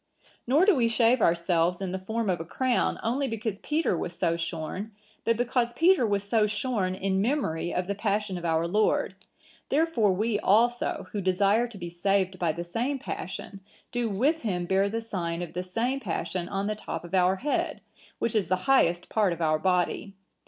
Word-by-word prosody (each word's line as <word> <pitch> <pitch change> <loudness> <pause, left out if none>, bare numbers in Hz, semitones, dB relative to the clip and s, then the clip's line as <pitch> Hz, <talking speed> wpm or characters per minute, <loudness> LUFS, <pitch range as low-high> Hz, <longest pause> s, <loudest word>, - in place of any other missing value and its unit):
Nor 295 +9 +4
do 410 -3 +5
we 240 -4 +3
shave 230 +1 +3
ourselves 170 0 +2
in 190 -2 -3
the 190 - -3
form 220 +4 -2
of 180 -3 0
a - - -3
crown 250 +9 0
only 265 +5 0
because 220 -3 -3
Peter 305 - 0
was 175 +1 -4
so 170 - +1
shorn; 170 +5 -4 0.3
but 230 -1 +2
because 240 0 0
Peter 330 -3 +4
was 200 -1 0
so 210 +1 +2
shorn 210 -3 -1
in 190 0 0
memory 200 - -1
of 180 - -1
the 200 - -2
Passion 205 -1 -1
of 175 - -6
our 165 0 +1
Lord, 210 +5 +1 0.6
therefore 285 -9 +2
we 210 +3 0
also, 235 +5 +2
who 205 - -2
desire 200 +5 +2
to 230 -3 -11
be 175 -2 -6
saved 185 +2 0
by 170 -3 +1
the 170 +2 -5
same 240 +11 -2
Passion, 195 -4 -6 0.3
do 240 -2 -1
with 275 +11 +1
him 180 -6 -2
bear 195 +2 +2
the 225 +2 -2
sign 175 -6 -3
of 165 -2 -8
the 180 - -2
same 230 +9 -1
Passion 180 -5 -3
on 195 0 -2
the 215 - 0
top 210 - -6
of 175 +1 -11
our 185 0 +4
head, 285 +9 -1 0.4
which 230 - -1
is 215 -4 +1
the 185 0 -1
highest 175 -10 +3
part 210 -4 +2
of 170 - -8
our 155 -2 +2
body. 180 +3 0
200 Hz, 195 wpm, -27 LUFS, 180-230 Hz, 0.6 s, do